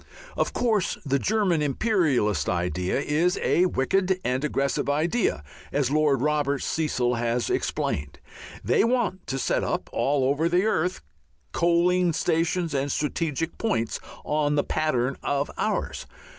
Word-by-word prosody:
Of - - 0
course 220 -6 0
the 140 0 +1
German 195 -5 +1
imperialist 140 - +1
idea 90 - -1
is 160 +5 +1
a 180 +2 +2
wicked 185 +5 +1
and 130 +2 -1
aggressive 140 -1 0
idea, 155 - 0 0.3
as 140 -2 0
Lord 150 -3 +2
Robert 145 -2 0
Cecil 130 -6 0
has 120 0 0
explained; 70 -1 -2 0.5
they - - +3
want 230 -6 0
to 135 - -2
set - - 0
up - - -3
all 140 -1 +1
over 145 +5 +1
the 180 +3 +2
earth 180 -4 0 0.5
coaling 175 +1 +2
stations 165 +1 0
and 140 0 0
strategic 160 +2 -2
points, 195 - -1 0.3
_on 150 -1 +1
the 145 - +2
pattern 135 -4 0
of 140 0 -1
ours. - - -2
150 Hz, 135 wpm, -25 LUFS, 135-180 Hz, 0.5 s, they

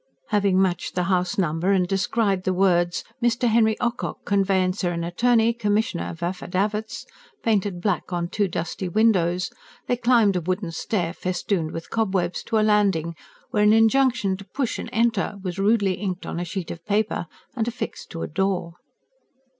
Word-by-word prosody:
Having 200 -2 +2
matched 180 -3 0
the 180 - +1
house 180 +2 0
number 170 0 +1
and 185 -2 +2
descried 195 0 0
the 185 0 0
words: 175 -2 +2 0.2
"Mr. 240 +1 +2
Henry 220 -1 +3
Ocock, 240 0 -2
Conveyancer 190 -2 +1
and 170 -1 -2
Attorney, 230 +6 +3
Commissioner 210 -4 0
of 170 +1 -8
Affidavits," 195 +4 -2 0.4
painted 205 -5 +1
black 195 -1 -1
on 175 -1 -1
two 205 +3 0
dusty 175 +1 -4
windows, 180 -4 +2 0.3
they 245 - +1
climbed 235 -5 +3
a 180 - 0
wooden 185 +1 -2
stair 170 0 -2
festooned 180 -2 -2
with 165 +1 -7
cobwebs, 190 -6 0
to 225 - 0
a 215 - +3
landing 195 -6 +2 0.4
where 210 - +1
an 210 +1 +6
injunction 225 -2 +3
to: 200 - -10
"Push 265 +2 -3
and - - -5
Enter!" 230 -2 +1
was, 185 0 -4
rudely 200 -1 +3
inked 185 -1 -4
on - - -4
a 175 - -2
sheet 180 0 -5
of 170 0 -8
paper 210 -3 0 0.3
and 225 -2 -1
affixed 240 +1 -5
to 165 - -5
a - - -3
door. 180 0 -1
195 Hz, 170 wpm, -24 LUFS, 180-220 Hz, 0.4 s, an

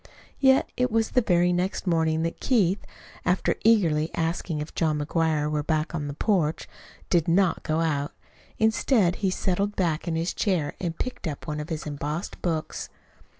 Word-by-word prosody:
Yet 265 -1 +5
it 250 0 +1
was 225 0 +1
the 250 - +4
very 180 -4 +3
next 180 +4 -1
morning 160 -2 +1
that 165 - -3
Keith, 200 -6 +2 0.4
after 180 +1 +1
eagerly 170 -9 +3
asking 165 -1 -1
if 150 +2 -6
John 155 -2 +1
McGuire 155 0 +1
were 150 -1 -1 0.3
on 150 -3 -2
the 140 - -4
back - - -17
porch, 170 -8 +1 0.4
did 170 -3 +3
not 180 +1 +3
go 155 +1 0
out. 145 -3 0 0.5
Instead 220 -4 +2
he 195 - +1
settled 195 +2 -1
back 170 -3 0
in 165 - 0
his 165 +2 -1
chair 175 -9 0
and 170 -4 -3
picked 250 -7 -4
up 145 -3 -5
one 150 0 -3
of 150 +2 -6
his 160 -2 -4
embossed 150 +4 -4
books. 160 -3 -2
170 Hz, 175 wpm, -26 LUFS, 155-190 Hz, 0.5 s, Yet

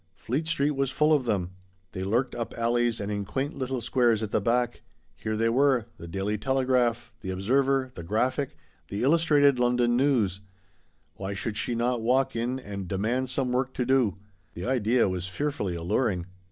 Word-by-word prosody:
Fleet 140 +10 -2
Street 150 -2 +1
was 135 -2 0
full 150 +4 +3
of 140 -4 +2
them. 95 -6 -1 0.4
They 95 - -4
lurked 120 +7 0
"up 115 -1 -5
alleys 120 0 +1
and 100 +1 -3
in 100 -1 -2
quaint 135 - -3
little 130 -1 -3
squares 115 -3 +2
at 105 - -4
the - - +1
back. 120 +3 0 0.3
Here 110 0 -3
they 115 +1 +2
were: 130 -1 +3
The 85 - -9
Daily 100 +4 -2
Telegram, 130 -1 +2 0.2
The 95 - -6
Observer, 130 +7 +1
The - - -7
Graphic, 125 - -1 0.3
Black 100 +3 -3
and 145 -3 +4 0.4
White. 115 -9 +2 0.8
Why 95 +1 -4
should 105 +2 -3
she 120 - -1
not 120 0 0
walk 125 +3 +2
in 120 +3 -1
and 100 -6 -6
demand 115 +8 -1
some 130 -1 -1
work 130 +1 -1
to 125 - 0
do? 125 -6 +2 0.4
The 90 - -5
idea 120 -1 +2
was 95 -1 -3
fearfully 105 -3 -2
alluring. 90 +2 0
120 Hz, 175 wpm, -27 LUFS, 105-130 Hz, 0.8 s, and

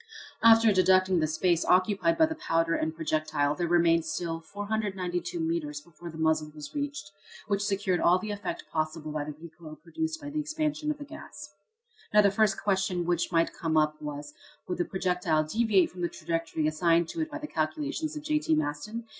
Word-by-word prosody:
After 225 -1 +7
deducting 185 -1 +4
the 155 - +1
space 170 +2 +1
occupied 200 - +3
by 320 - +6
the 320 - -3
powder 165 - 0
and 160 -1 -1
projectile 155 -2 0
there 170 +3 -2
remained 170 -1 +4
still 165 +1 -3
492 190 -2 -3
metres 160 -3 -2
before 170 +2 -11
the 160 - -9
muzzle 160 -1 +1
was 150 -1 -9
reached, 285 -8 -4 0.4
which 200 -1 0
secured 195 -3 0
all 175 +1 +5
the 210 +3 -5
effect 205 -2 -4
possible 155 -1 -2
by 150 -1 -3
the 150 -1 -6
recoil 160 -1 -11
produced 320 - -4
by 290 -1 -7
the 305 - -2
expansion 305 0 -2
of 300 - -1
the 290 - -8
gas. 310 +2 -10 0.6
Now, 210 - +8
the 200 - +4
first 210 0 +2
question 190 -3 0
which 175 0 0
might 165 -1 +2
come 160 -2 -1
up 155 0 +1
was, 145 0 -6 0.3
would 180 - -3
the 175 - +1
projectile 180 -4 0
deviate 205 +3 +2
from 180 - -9
the 175 - 0
trajectory 165 -2 -2
assigned 165 +2 +2
to 330 - -3
it 315 - -2
by 305 - -5
the 305 - -6
calculations 300 - -2
of 300 - -6
J.T. 300 - +1
Maston? 155 +10 -3
175 Hz, 190 wpm, -28 LUFS, 160-215 Hz, 0.6 s, Now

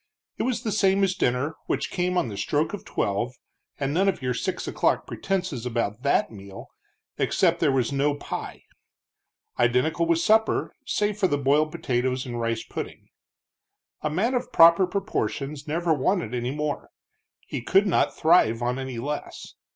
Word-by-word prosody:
It - - -2
was 250 +1 -1
the 220 - -1
same 195 0 +3
as 190 -1 +2
dinner, 140 -1 0
which - - -1
came 180 0 0
on 155 - +1
the 105 - -6
stroke 150 - 0
of 205 - -5
twelve, 115 +5 -2 0.4
and 140 0 -1
none 190 +4 +3
of 195 - -2
your 125 -1 -1
six 115 - -3
o'clock - - +1
pretenses 185 -10 -3
about 115 -2 -2
that 140 -3 +2
meal, 100 -2 -11 0.5
except - - +2
there - - +3
was 130 -2 +1
no 140 +1 +1
pie; 145 - -6 1.0
identical 125 +8 +2
with 170 -1 +3
supper, 220 +6 +2
save 210 0 0
for 190 - +4
the 145 - 0
boiled 145 +3 +2
potatoes 130 0 -1
and 120 -2 -4
rice 115 -1 -1
pudding. - - -7 0.9
A 150 - -1
man 200 +11 0
of 250 - -2
proper 170 +3 +7
proportions 155 -7 -3
never 165 +2 +1
wanted 155 - 0
any 120 0 -1
more; 150 +1 -3 0.6
he - - -5
could 195 - +3
not 190 - +1
thrive 155 -9 +4
on 125 +2 -1
any 130 -2 -5
less. 145 +5 -5
145 Hz, 165 wpm, -25 LUFS, 125-180 Hz, 1.0 s, proper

